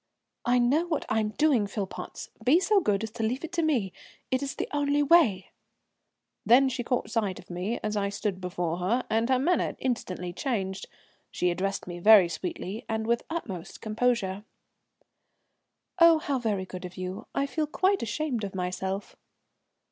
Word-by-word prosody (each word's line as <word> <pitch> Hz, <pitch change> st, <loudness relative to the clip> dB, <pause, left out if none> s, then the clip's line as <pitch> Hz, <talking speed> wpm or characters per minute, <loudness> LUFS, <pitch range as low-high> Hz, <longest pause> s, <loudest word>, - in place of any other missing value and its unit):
"I 245 Hz, +1 st, +3 dB
know 275 Hz, +8 st, +2 dB
what 320 Hz, -3 st, -1 dB
I 220 Hz, -, +2 dB
am 215 Hz, -1 st, 0 dB
doing, 250 Hz, -3 st, +2 dB
Philpotts. 200 Hz, -1 st, -6 dB
Be 290 Hz, +7 st, +5 dB
so 405 Hz, +2 st, +3 dB
good 210 Hz, -, 0 dB
as 220 Hz, -, -4 dB
to 225 Hz, 0 st, -4 dB
leave 250 Hz, +6 st, -1 dB
it 330 Hz, -, -5 dB
to 340 Hz, -1 st, 0 dB
me. 245 Hz, -, 0 dB, 0.4 s
It 260 Hz, +1 st, +1 dB
is 280 Hz, -1 st, -3 dB
the -, -, -3 dB
only 290 Hz, 0 st, +2 dB
way." 275 Hz, -, +4 dB, 0.9 s
Then 265 Hz, +3 st, +6 dB
she 255 Hz, -1 st, -3 dB
caught 250 Hz, +1 st, -1 dB
sight 205 Hz, -5 st, 0 dB
of -, -, -12 dB
me 185 Hz, +7 st, -2 dB
as 215 Hz, 0 st, -1 dB
I 200 Hz, -1 st, 0 dB
stood 200 Hz, -2 st, -3 dB
before 175 Hz, -2 st, -2 dB
her, 215 Hz, +8 st, 0 dB
and 225 Hz, +2 st, +1 dB
her 260 Hz, -, +4 dB
manner 330 Hz, +7 st, +1 dB
instantly 185 Hz, -8 st, -3 dB
changed. 190 Hz, -3 st, -3 dB, 0.4 s
She 180 Hz, 0 st, 0 dB
addressed 195 Hz, +3 st, -2 dB
me 175 Hz, -1 st, -7 dB
very 200 Hz, -2 st, +7 dB
sweetly 190 Hz, +5 st, -5 dB
and 220 Hz, 0 st, -1 dB
with 235 Hz, +1 st, +2 dB
the -, -, -21 dB
utmost 190 Hz, -, -6 dB
composure. 215 Hz, -3 st, 0 dB, 1.6 s
"Oh, 335 Hz, -1 st, +8 dB
how 290 Hz, -5 st, -1 dB
very 210 Hz, -5 st, -1 dB
good 185 Hz, 0 st, -8 dB
of 180 Hz, +1 st, -8 dB
you, 185 Hz, +4 st, -5 dB
I 275 Hz, -, +1 dB
feel 305 Hz, +2 st, -2 dB
quite 380 Hz, +5 st, +1 dB
ashamed 240 Hz, +1 st, -2 dB
of 195 Hz, -1 st, -5 dB
myself." 190 Hz, +2 st, -3 dB
220 Hz, 180 wpm, -28 LUFS, 190-275 Hz, 1.6 s, Oh